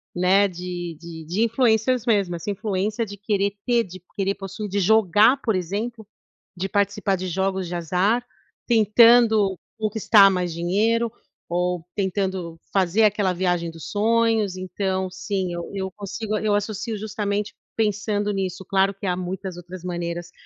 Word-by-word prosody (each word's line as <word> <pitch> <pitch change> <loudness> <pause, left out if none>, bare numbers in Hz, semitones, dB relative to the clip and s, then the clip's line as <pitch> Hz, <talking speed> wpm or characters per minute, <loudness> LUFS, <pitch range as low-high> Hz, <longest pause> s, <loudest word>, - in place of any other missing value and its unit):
né. 190 +3 +4
De 175 -2 -6
de 165 -1 -9
de 180 +8 0
influencers 230 0 +2
mesmo, 200 -7 +2
essa 170 +5 -5
influência 210 +2 -1
de 205 -1 -8
querer 200 0 0
ter, 240 -2 +3
de 185 0 -11 0.2
querer 195 0 0
possuir, 195 +2 -6
de 200 +2 -1
jogar, 215 +4 +5
por 225 - 0
exemplo, 210 +6 -3 0.5
de 185 +2 -2
participar 200 -1 +1
de 185 +1 -4
jogos 190 +1 -1
de 175 - -4
azar, 185 +8 +1 0.4
tentando 220 -3 +5 0.2
conquistar 215 -1 +5
mais 180 -2 -1
dinheiro 215 +8 +1 0.4
ou 180 0 -1
tentando 190 -4 -2
fazer 195 +2 +3
aquela 205 -2 +3
viagem 175 -2 0
dos 165 -1 -9
sonhos. 220 -2 +2
Então, 185 0 -2
sim, 185 -1 -3
eu 170 0 -4
eu 190 -1 -3
consigo 210 +2 -4
eu 215 -1 0
associo 210 +2 -2
justamente 210 -1 -3 0.2
pensando 210 -1 0
nisso. 190 -1 -3
Claro 195 +1 +2
que 195 - -9
há 180 - +1
muitas 185 0 -5
outras 175 0 -9
maneiras 175 0 -4
195 Hz, 150 wpm, -23 LUFS, 180-215 Hz, 0.5 s, jogar